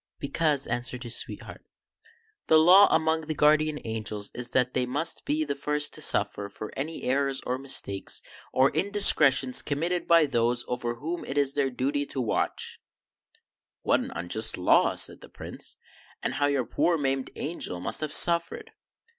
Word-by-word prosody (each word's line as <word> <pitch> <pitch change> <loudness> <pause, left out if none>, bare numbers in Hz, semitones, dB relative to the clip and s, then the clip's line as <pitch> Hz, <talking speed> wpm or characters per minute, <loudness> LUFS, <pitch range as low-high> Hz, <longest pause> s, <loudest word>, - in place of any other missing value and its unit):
" - - -62
Because," 145 0 -1
answered 120 +1 -2
his 120 -1 -1
sweetheart, - - -4 0.4
" 455 -1 -32
the 160 - +5
law 180 +6 +6
among 160 -1 0
the 155 - -4
Guardian 155 +1 +2
Angels 110 -2 -5
is 125 0 -5
that 125 0 0
they 125 -1 -1
must 145 +7 -1
be 155 +1 -1
the 145 -2 -3
first 150 +1 -1
to - - -1
suffer 100 0 +4
for 105 - -10
any 155 +4 -5
errors 135 +1 0
or 125 +1 -3
mistakes 130 -7 -1 0.3
or 130 +1 +2
indiscretions 155 -8 +4
committed 170 +5 -3
by 165 -2 +4
those 120 -2 0
over 120 -1 -4
whom 160 +8 -6
it 135 - -6
is 140 -1 +1
their 140 -2 -1
duty 140 +3 -3
to 135 - -5
watch 120 -4 -3 0.3
" - - -35 0.2
" - - -68
What - - +2
an - - -6
unjust 90 +6 +1
law," 90 - +2
said - - -1
the - - -13
Prince, - - -8 0.2
" - - -28
and - - -2
how 145 +2 +1
your 140 -3 -1
poor 160 +8 0
maimed 135 -2 -2
angel 145 - -5
must 90 - -1
have 155 -1 -4
suffered 170 +1 +4
140 Hz, 180 wpm, -26 LUFS, 125-155 Hz, 0.4 s, law